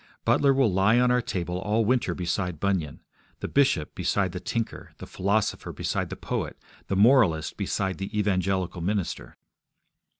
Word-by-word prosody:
Butler 140 - +4
will 130 -7 +2
lie 100 +5 +4
on 125 0 +3
our 125 0 +3
table 90 -4 -3
all 105 +3 +1
winter 120 -7 +1
beside 90 -1 -2
Bunyan; 95 -6 -1 0.4
the - - -4
bishop 130 - +2
beside 95 -3 0
the 90 - -5
tinker, 115 +4 -4
the - - -9
philosopher 100 +3 -1
beside - - -2
the - - -5
poet, - - -4 0.3
the 100 - -1
moralist 100 - +4
beside 95 -1 -2
the 95 +2 -4
evangelical 95 -3 0
minister. 95 0 -3
95 Hz, 155 wpm, -26 LUFS, 90-115 Hz, 0.4 s, Butler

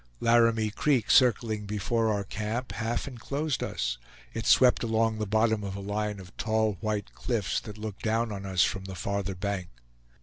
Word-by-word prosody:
Laramie 115 -2 +3
Creek, 130 +1 +1
circling 110 -4 +3
before 110 +2 0
our 100 -1 0
camp, 110 +5 -3
half 115 +4 -2
inclosed 140 +3 -3
us; - - -2 0.3
it 110 -1 -3
swept 125 -1 +6
along 115 -1 +1
the 105 - -2
bottom 110 0 +2
of 100 -1 -4
a - - -5
line 105 +1 -2
of 90 -2 -12
tall 110 -3 0
white 105 -2 -2
cliffs 110 -8 -1
that 105 -1 -10
looked 105 -2 -6
down 115 0 0
on 100 -1 -5
us 95 -2 +2
from 95 -1 -1
the 95 -1 -6
farther 100 +1 -2
bank. 95 -1 -3
110 Hz, 175 wpm, -28 LUFS, 100-115 Hz, 0.3 s, swept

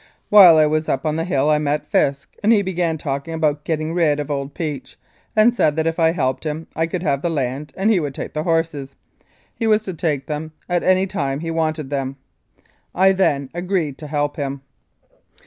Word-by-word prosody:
While 185 -6 +9
I 155 - +6
was 155 +1 0
up 135 - -1
on 155 0 0
the 165 - -1
hill 150 -4 +1
I 150 - +3
met 150 0 -2
Fisk, 140 0 0
and 210 - +3
he 210 -3 +4
began 175 -3 -1
talking 140 +2 -4
about 150 -2 0
getting 155 0 -2
rid 160 -4 +2
of 145 0 -4
old 140 0 -4
Peach, 150 -6 -5 0.4
and 220 +2 +5
said 155 -11 +2
that 160 0 0
if 165 +1 -1
I 165 -1 +4
helped 140 -2 -1 0.3
I 165 0 0
could 175 +1 -4
have 140 -4 0
the 170 - -1
land 140 -1 -3
and 200 +4 +2
he 200 - +3
would 145 -4 -4
take - - -6
the 155 - -2
horses. 165 -4 -1 0.6
He 225 - -2
was 215 0 +3
to 190 - -5
take 150 -4 -2
them 155 +1 -5
at 175 -1 0
any 185 +1 +3
time 140 -6 -3
he 165 0 -3
wanted 155 -3 -2
them. 135 -1 -3 0.8
"I 190 +1 +5
then 145 -8 0
agreed 175 -5 -2
to 150 - -8
help 145 +1 -2
him. 140 -2 -4
155 Hz, 210 wpm, -20 LUFS, 145-175 Hz, 0.8 s, While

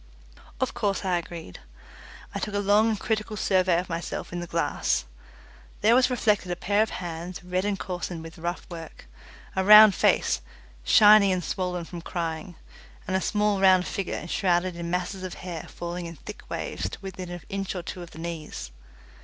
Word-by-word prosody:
Of - - 0
course 200 -1 -1
I 180 -2 +2
agreed. 165 - -9 0.7
I - - -3
took 205 - -4
a - - +2
long 205 +2 +4
and 215 -2 -1
critical 215 -1 -2
survey 185 -3 +3
of 180 - -5
myself 170 0 -5
in 175 - -3
the 175 - -5
glass. 165 - 0 0.8
There 220 +3 +5
was 250 +1 +5
reflected 210 -7 +1
a - - 0
pair 205 +4 +1
of 220 - +1
hands, 175 0 -6
red 180 +2 -1
and 205 -1 0
coarsened 175 -3 -5
with 165 +1 -11
rough 170 +1 -4
work, 165 -2 -9 0.5
a 190 - +1
round 210 +1 +10
face, - - +2 0.4
shiny 210 - +7
and 180 -1 0
swollen 180 0 -3
with 170 -2 -7
crying, 165 0 -4 0.5
and 185 - -1
a 190 - +1
small 210 -1 +1
round 185 -1 +6
figure 195 -2 -3
enshrouded 175 0 0
in 170 0 -5
masses 180 +2 -2
of 185 -1 -5
hair 175 -3 -7
falling 175 0 -5
in 165 - -8
thick - - -11
waves 90 - -3
to - - -8
within 185 -2 -6
an 175 -1 -6
inch 195 0 -3
or 180 - -4
two 180 - -6
of 175 - -9
the - - -14
knees. 160 - -6
180 Hz, 185 wpm, -26 LUFS, 170-200 Hz, 0.8 s, round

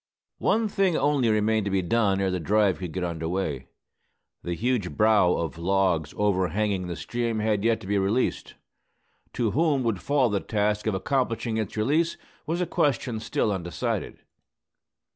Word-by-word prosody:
One 225 0 +2
thing 195 -5 +1
only 145 -5 +2
remained 110 0 +2
to - - -1
be 95 -1 0
done 100 +1 +2
ere 95 -1 +1
the 90 - -1
drive 100 +2 +2
could 90 -3 -5
get 90 +2 -3
under 80 -2 -3
way. 80 -8 -3 0.7
The 85 0 -3
huge 115 -4 -1
"brow" 105 -5 +4
of 80 -1 -3
logs 90 -4 +1
over 95 -3 +2
hanging 100 0 -1
the 85 - -4
stream 120 +4 -2
had 105 -2 0
yet 115 0 +2
to - - -10
be 100 +1 +1
released. 105 +6 -1 0.8
To 115 -3 0
whom 150 -2 +2
would 115 -5 -1
fall 140 -5 +2
the 100 - +1
task 105 0 -1
of 110 - +1
accomplishing 115 +1 -1
its 110 -1 -3
release, 155 +10 +1 0.3
was 170 +3 -1
a - - +1
question 130 -7 0
still 110 -1 -1
undecided. 85 -4 -3
105 Hz, 170 wpm, -26 LUFS, 95-120 Hz, 0.8 s, brow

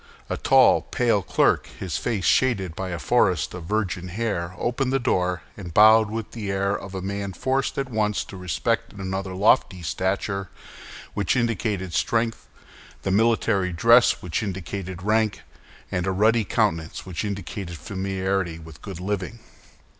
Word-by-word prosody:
A - - -1
tall, - - +5
pale 115 -5 +1
clerk, - - +2
his 95 -3 -3
face 100 -6 -2
shaded 100 -10 +2
by 95 +1 -4
a 85 - -3
forest 90 -5 +2
of 90 -2 -7
virgin 95 -2 -1
hair, 90 -3 -3
opened 125 +2 -1
the 135 - +3
door, 90 -9 0
and 90 -4 -8
bowed 110 +1 +7
with 110 0 -5
the 105 -4 -5
air 100 +1 0
of 95 -1 -7
a 95 - -4
man 100 0 -3
forced 130 +6 -1
at 135 -1 -1
once 105 -2 0
to - - -11
respect 90 -4 -1
in 105 - -12
another 95 0 -3
lofty 95 -2 +3
stature, 95 +3 -2 0.6
which 100 +4 0
indicated 105 -6 -1
strength, 115 0 0 0.6
the 95 - 0
military 100 -3 +2
dress, 115 +8 +5
which 90 +4 -2
indicated 95 -2 -5
rank, 110 0 +1 0.5
and 90 0 -1
a - - +2
ruddy 110 +3 +3
countenance, 80 -3 -1
which 90 -1 -4
indicated 100 -3 -5
familiarity 95 -2 -2
with 80 -4 -13
good 95 -4 -7
living. 100 +3 -3
100 Hz, 155 wpm, -24 LUFS, 90-110 Hz, 0.6 s, bowed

